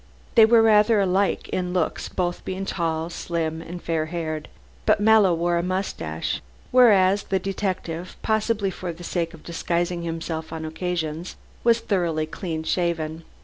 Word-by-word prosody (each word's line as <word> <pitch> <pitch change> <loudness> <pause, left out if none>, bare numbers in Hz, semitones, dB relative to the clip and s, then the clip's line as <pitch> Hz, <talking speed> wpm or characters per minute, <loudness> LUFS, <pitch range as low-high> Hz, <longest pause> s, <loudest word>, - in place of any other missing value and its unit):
They 225 -2 +8
were 225 0 +6
rather 210 -1 +5
like 190 0 +1
in 180 -1 -2
looks, 180 -3 -1
both 175 -1 -2
being 190 +1 -4
tall, 165 -2 -2
slim 165 -1 -3
and 175 +2 -7
fair 160 -2 -1
haired. 155 -2 -4 0.4
But 215 -1 +5
Mallow 210 -2 +5
wore 170 +1 +1
a - - +1
mustache, 180 - -2 0.3
whereas 205 -6 +6
the 195 - +1
detective, 185 -3 -3
possibly 215 -2 +1
for 180 -1 -5
the 170 +1 -11
sake 170 -1 -2
of 155 - -17
disguising 170 +1 -1
himself 165 -1 -4
on 160 -1 -5
occasions, 165 0 -3 0.3
was 230 -1 +3 0.5
clean 160 -4 -4
shaven. 165 -2 -1
175 Hz, 145 wpm, -24 LUFS, 165-195 Hz, 0.5 s, They